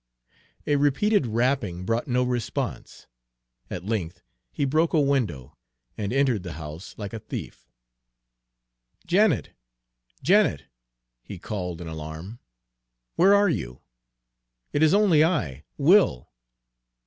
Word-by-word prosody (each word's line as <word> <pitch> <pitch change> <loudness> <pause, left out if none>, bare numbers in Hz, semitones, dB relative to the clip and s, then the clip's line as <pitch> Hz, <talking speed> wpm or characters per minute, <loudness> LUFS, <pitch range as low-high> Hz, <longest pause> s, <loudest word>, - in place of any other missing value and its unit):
A 145 - +2
repeated 145 - +2
rapping 115 -6 -1
brought 115 +6 -1
no 125 -1 +1
response. 125 -2 -4 0.6
At 90 0 -6
length 100 -6 -3 0.3
he 140 - -1
broke 155 +5 +1
a 160 - +4
window, 125 - -1 0.4
and 100 -2 -3
entered 130 -5 +2
the 90 -1 -7
house 80 +3 -9
like 100 -1 -6
a 115 - -4
thief. 65 - -8 1.4
"Janet, 195 0 +2 0.7
Janet!" 155 - +3 0.6
he 100 +9 -9
called 90 -2 -5
in 85 - -7
alarm, 80 +7 -7 0.8
"where 195 +3 +6
are 205 0 +4
you? 60 - -4 0.9
It 145 - +1
is 155 +4 +5
only 190 -7 +5
I, 85 - -1
Will!" 155 - +3
120 Hz, 115 wpm, -25 LUFS, -, 1.4 s, where